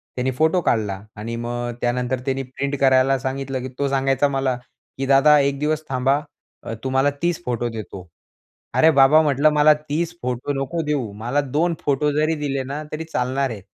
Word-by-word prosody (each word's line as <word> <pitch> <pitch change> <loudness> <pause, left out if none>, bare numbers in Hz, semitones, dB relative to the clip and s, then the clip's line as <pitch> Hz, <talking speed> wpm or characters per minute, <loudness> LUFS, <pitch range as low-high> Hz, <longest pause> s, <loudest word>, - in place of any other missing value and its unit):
त्याने 130 +1 -1
फोटो 160 +7 +2
काढला 105 - 0 0.2
आणि 115 +2 -5
मग 120 +1 -3
त्यानंतर 125 +1 -1
त्याने 135 0 -1
प्रिंट 135 +2 -4
करायला 135 0 +4
सांगितलं, 135 0 -3
की 130 - -5
तो 140 - +1
सांगायचा 135 +1 +2
मला, 135 -2 0 0.4
की 135 - -2
"दादा, 140 +2 +6
1 140 0 0
दिवस 155 +1 -1
थांबा. 135 +2 +1 0.4
अ, - - -5
तुम्हाला 135 +2 +2
30 175 0 -1
फोटो 120 -1 -1
देतो." 100 -5 -8 0.7
अरे 160 +1 +6
बाबा, 140 +2 +6
म्हटलं, 145 0 +3
"मला 150 0 +5
30 165 +4 -1
फोटो 125 +3 -2
नको 165 +4 -3
देऊ. 135 -8 -1
मला 120 +7 -1 0.2
2 170 +2 +2
फोटो 145 +1 +1
जरी 155 +2 +1
दिले 140 -2 -1
ना 140 +3 -5
तरी 160 +1 -4
चालणार 135 -3 -1
आहे." 110 -3 -6
135 Hz, 180 wpm, -22 LUFS, 125-150 Hz, 0.7 s, दादा